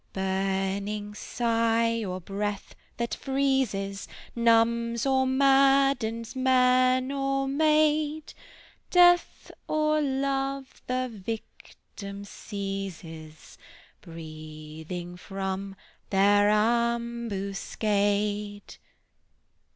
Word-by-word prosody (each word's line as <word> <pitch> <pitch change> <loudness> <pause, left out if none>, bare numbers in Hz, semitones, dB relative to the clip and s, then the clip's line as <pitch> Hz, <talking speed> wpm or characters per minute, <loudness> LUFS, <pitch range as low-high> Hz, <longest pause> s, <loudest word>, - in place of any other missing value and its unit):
Burning 195 +2 -2
sigh, 230 0 0
or 185 -2 -4
breath 200 +2 -4 0.2
that 235 0 -2
freezes, 265 -8 -1 0.3
Numbs 235 0 +2
or 265 -1 +2
maddens 270 -4 +3
man 255 0 +3
or 275 0 -1
maid; 305 +1 +2 0.6
Death 350 -1 +4 0.2
or 305 0 +1
Love 275 -1 -2
the 255 0 -1
victim 200 -2 -8
seizes, 190 -7 -7 0.4
Breathing 160 +2 -8
from 195 +1 -5 0.3
their 205 +1 +4
ambuscade." 210 -2 -1
225 Hz, 65 wpm, -27 LUFS, 195-265 Hz, 0.6 s, Death